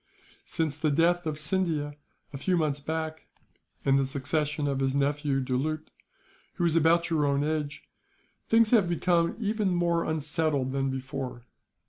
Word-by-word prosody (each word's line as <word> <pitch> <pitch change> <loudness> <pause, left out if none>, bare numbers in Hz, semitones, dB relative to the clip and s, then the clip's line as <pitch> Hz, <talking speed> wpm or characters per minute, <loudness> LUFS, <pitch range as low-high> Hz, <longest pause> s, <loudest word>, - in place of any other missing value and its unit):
Since 155 -2 -2
the 155 - +1
death 170 +3 +2
of 155 -1 -2
Scindia, 155 -4 0 0.4
a - - -4
few 180 +4 +1
months 150 -3 0
back; 160 +1 -4 0.6
and 135 0 +4
the 135 - +1
succession 145 +2 -1
of 135 -1 -1
his 135 0 0
nephew 140 0 +1
Doulut, 140 +5 -2 0.6
who 175 - 0
is 165 -1 +2
about 170 +1 +3
your 155 -2 +2
own 140 0 +1
age; 150 -1 -2 0.6
things 225 -1 +4
have 210 -8 +4
become 170 0 +1
even 215 -2 0
more 175 -1 +1
unsettled 155 -3 0
than 135 0 0
before. 130 -2 -5
155 Hz, 150 wpm, -28 LUFS, 140-170 Hz, 0.6 s, and